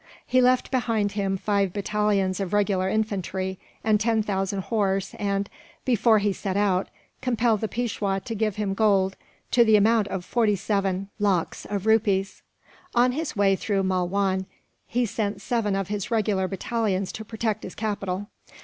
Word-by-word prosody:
He 255 +1 +3
left 255 0 +3
behind 225 -5 +1
him 195 -2 -1
five 200 -2 0
battalions 205 -2 0
of 195 0 -3
regular 195 -2 +2
infantry, 190 -3 -2 0.2
and 215 -1 +3
ten 225 0 +2
thousand 195 -1 -1
horse 195 -2 0
and, 200 -1 0 0.4
before 230 -2 +4
he 205 -1 +1
set 190 0 -3
out, 195 -2 +1 0.3
compelled 235 -4 +1
the 220 - 0
Peishwa 210 -4 -1
to 230 - -3
give 215 -2 -1
him 205 -2 -1
gold 195 -2 +2 0.4
to 240 - +6
the 220 -2 +5
amount 215 0 +4
of 185 -3 -4
forty 225 -4 +2
seven 195 -1 -1
lakhs 195 -5 0
of 205 -1 -3
rupees. 205 -3 +2 0.5
On 245 +1 +5
his 310 +4 -3
way 200 -1 +3
through 200 -2 -1
Malwan, 190 +1 0 0.4
he 245 +1 +1
sent 210 -2 -2
seven 210 -2 0
of 195 -1 -2
his 205 -2 -3
regular 210 -4 +1
battalions 200 -1 -1
to 220 - -7
protect 220 -1 -2
his - - -8
capital. 205 -3 -2
205 Hz, 160 wpm, -25 LUFS, 195-220 Hz, 0.5 s, to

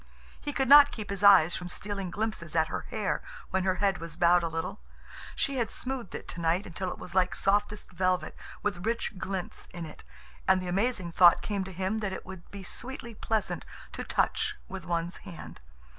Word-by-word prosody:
He 290 - -3
could 270 -2 0
not 285 +1 +9
keep 210 -3 -6
his 200 -1 -1
eyes 195 -5 +7
from 180 -1 -5
stealing 195 0 -2
glimpses 200 -5 -3
at 160 -1 +3
her - - -4
hair - - -1 0.3
when 190 0 +1
her 185 -1 +2
head 195 -1 +1
was 165 -1 -7
bowed 175 0 +5
a 170 - -1
little. 165 +5 -4 0.6
She 275 -1 0
had 235 -3 0
smoothed 255 -6 -4
it - - -7
tonight 170 +3 0
until 185 +1 -4
it - - -6
was 180 - -8
like 185 -1 +2
softest 205 +1 0
velvet, 185 0 0 0.3
with 180 -4 -1
rich 225 -3 -2
glints 190 -1 -4
in 175 -1 -7
it, 155 - -11 0.4
and 190 0 +5
the 185 - -5
amazing 195 -1 0
thought 175 0 +6
came 200 -2 -1
to 190 - -7
him 190 +4 -1
that 210 -3 -2
it - - -6
would 190 -2 -10
be 200 -1 -8
sweetly 235 +4 -6
pleasant 220 0 -1 0.3
to - - -5
touch - - +1
with 190 -3 -7
one's 170 0 -1
hand. 175 - -10
190 Hz, 200 wpm, -29 LUFS, 175-210 Hz, 0.6 s, not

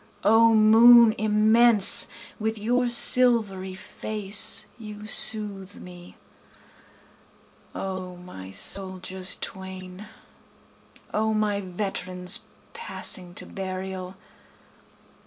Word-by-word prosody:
O 225 +2 +4
moon 225 +1 +6
immense 215 0 +3 0.3
with 220 +1 -3
your 245 +4 -1
silvery 225 -6 +4
face 210 +1 -1
you 210 -1 -10
soothe 205 -3 -1
me! 180 -1 -14 1.6
O 185 -1 -7
my 175 - -12
soldiers 185 - -2
twain! 190 +1 -9 1.1
O 220 0 -1
my 210 -1 -1
veterans 185 -1 -3 0.3
passing 185 - -4
to - - -8
burial! 185 -1 -7
200 Hz, 80 wpm, -24 LUFS, 185-220 Hz, 1.6 s, moon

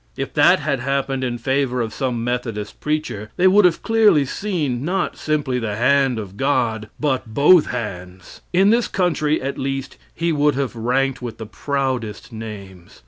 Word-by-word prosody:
If - - -4
that - - +5
had 140 -2 -1
happened 135 0 -1
in 120 -2 -2
favor 130 +1 0
of 115 -2 -2
some 125 -4 -2
Methodist 115 -4 -4
preacher, 150 -9 -3
they 185 - +4
would 200 +1 +6
have 175 -2 +2
clearly 215 -10 +4
seen, 150 -7 -2
not 180 +4 -1
simply 145 -5 -1
the 110 -3 -3
hand 130 +2 +2
of 100 -2 -7
God, 115 -5 0
but 130 -6 -2
both 155 +3 +6
hands. 90 -6 -7
In 190 +3 +4
this 235 +1 +2
country, 155 -5 0
at 140 +1 -3
least, 135 0 -4
he 170 0 -1
would 150 -2 +2
have 135 -3 -2
ranked 130 +3 0
with 120 -3 -6
the 110 - -7
proudest 125 -1 -3
names. 100 -5 -9
130 Hz, 170 wpm, -21 LUFS, 115-150 Hz, -, would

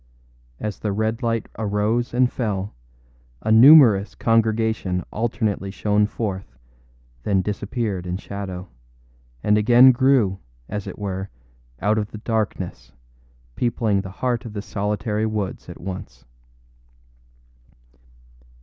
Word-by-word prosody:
As 105 -1 -4
the 105 - -2
red 110 +4 -1
light 115 -2 0
arose 110 +3 0
and 125 +1 +2
fell, 105 -4 -2 0.7
a 110 - 0
numerous 115 -4 +7
congregation 110 -5 +1
alternately 110 -3 -1
shone 105 +1 +1
forth, 95 - -5 0.6
then 95 +6 +1
disappeared 100 -2 -3
in 90 +1 -2
shadow, 95 -2 -6 0.8
and 105 0 +3
again 120 +4 +7
grew, 120 -7 +2 0.3
as 105 -1 -5
it - - -7
were, 95 -1 -4 0.5
out 105 +2 +2
of 105 -1 -3
the - - -8
darkness, 100 - -3 0.6
peopling 110 -4 0
the 95 - -8
heart 120 +5 -2
of 115 - -8
the 100 - -4
solitary 105 +1 -2
woods 105 -3 -4
at - - -9
once. 90 -9 -8
105 Hz, 115 wpm, -22 LUFS, 95-115 Hz, 0.8 s, numerous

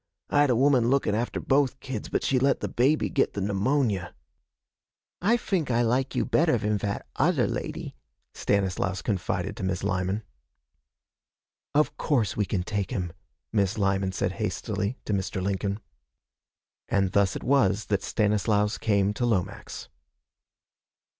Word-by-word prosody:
I 145 - +4
had 145 - +4
a 125 - +3
woman 130 -2 +4
lookin' 135 -6 +2
after 115 +3 -1
both 135 -1 +1
kids, 130 -6 -5
but - - -1
she 130 - +2
let 135 +1 +2
the - - -2
baby 135 +6 +2
git 135 - +1
the - - -3
pneumonia.' 100 -1 0 1.1
'I 220 +7 +3
fink 185 - -1
I 120 0 +2
like 125 +3 0
you - - +1
better 160 -6 +3
van 105 -1 0
vat 100 0 -3
other - - +3
lady,' - - -4 0.4
Stanislaus 95 -1 0
confided 100 -1 -2
to - - -5
Miss 95 -1 -1
Lyman. 100 +1 -1 1.5
'Of 150 +1 +2
course 125 -9 +1
we 105 - +1
can 90 -2 -1
take 100 -1 -2
him,' 90 -4 -3 0.4
Miss 100 0 +1
Lyman 95 -1 +1
said - - -1
hastily 100 +6 -2
to 105 - -1
Mr. 95 -1 -1
Lincoln. 100 +1 -1 1.1
And 95 -2 +2
thus 100 -1 +2
it - - -5
was 105 -7 +2
that 100 -2 0
Stanislaus 105 0 +1
came 100 -2 +2
to 120 - -1
Lomax. 100 -7 -2
105 Hz, 150 wpm, -27 LUFS, 100-130 Hz, 1.5 s, I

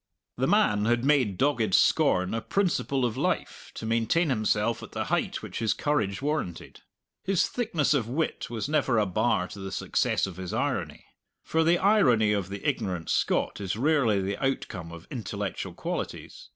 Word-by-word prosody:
The - - +1
man 105 0 +3
had 120 +2 +1
made 130 -10 +2
dogged 125 -8 +2
scorn 90 +2 +3
a 115 - -1
principle 150 - 0
of 120 0 -2
life 180 +5 -2
to - - -6
maintain 115 +9 +1
himself 110 -2 +1
at - - -10
the - - -2
height - - -1
which - - -6
his 110 -2 +1
courage 135 -8 -1
warranted. 150 - -3 0.4
His 195 -2 +2
thickness 175 - 0
of 125 -6 0
wit 150 +7 -2
was 115 +1 -3
never 140 -5 +1
a 105 - +3
bar 90 0 +1
to 100 - -9
the 95 0 -6
success - - 0
of 95 -3 -8
his 95 -1 -5
irony. - - -2 0.4
For 160 0 +1
the 170 +2 +4
irony 125 - +4
of 100 -2 -2
the 100 0 -5
ignorant 90 -4 -2
Scot - - 0
is 95 0 -2
rarely 125 -5 +2
the 100 +5 -3
outcome 95 -10 -2
of 85 0 -10
intellectual 100 - -4
qualities. - - -5
115 Hz, 175 wpm, -27 LUFS, 100-145 Hz, 0.4 s, the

